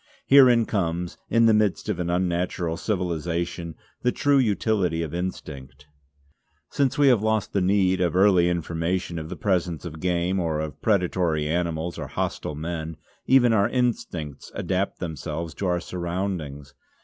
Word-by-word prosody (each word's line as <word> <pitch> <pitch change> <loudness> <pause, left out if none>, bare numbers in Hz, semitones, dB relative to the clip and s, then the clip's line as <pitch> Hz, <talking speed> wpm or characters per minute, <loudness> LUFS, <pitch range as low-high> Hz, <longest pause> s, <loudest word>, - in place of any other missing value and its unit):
Herein 125 -4 +6
comes, 85 -4 -2
in 115 0 +4
the 115 - +5
midst 105 -2 +1
of 105 -4 -2
an 85 -1 -2
unnatural 90 -1 -1
civilisation, 85 -3 -3 0.3
the 125 - +2
true 140 +1 +2
utility 100 -7 +1
of 80 - -6
instinct. 75 -6 -6 0.9
Since 135 0 +1
we 145 -1 +5
have 120 -5 +4
lost 110 -1 0
the 100 - +2
need 95 -1 +2
of 90 -2 +1
early 95 -2 +5
information 85 +1 -2
of 80 0 -7
the - - -5
presence 90 -4 -1
of 80 -2 -7
game 90 +2 0
or 80 -3 -1
of 75 -1 -5
predatory 90 -6 +1
animals 85 0 -2
or - - -5
hostile 75 - -3
men, 80 0 -5 0.3
even 125 -3 +5
our 100 -2 +3
instincts 95 - -2
adapt 95 +1 -1
themselves 80 -1 -5
to 95 - -3
our 90 -1 +1
surroundings. 85 -6 -4
90 Hz, 150 wpm, -25 LUFS, 80-100 Hz, 0.9 s, Herein